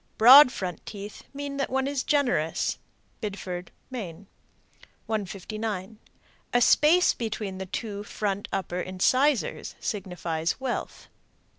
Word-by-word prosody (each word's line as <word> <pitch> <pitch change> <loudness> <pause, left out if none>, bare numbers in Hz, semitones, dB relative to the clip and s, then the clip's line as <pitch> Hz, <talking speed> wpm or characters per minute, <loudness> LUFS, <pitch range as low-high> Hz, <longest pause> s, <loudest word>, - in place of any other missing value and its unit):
Broad 250 +4 +10
front 180 -6 -5
teeth 205 0 -8
mean 280 0 -5
that 275 - -1
one 265 +1 0
is 280 -1 -1
generous. 250 - 0 0.4
Biddeford, 185 -4 -5 0.2
Me. 200 -7 -6 0.8
159. 215 0 -4 0.5
A 245 - +5
space 310 +8 +5
between 210 -4 -4
the 190 - -5
two 205 +1 -4
front 205 -1 -3
upper 185 -2 -2
incisors 255 +10 +1
signifies 175 -5 -3
wealth. 260 -2 -4
210 Hz, 110 wpm, -27 LUFS, 185-255 Hz, 0.8 s, Broad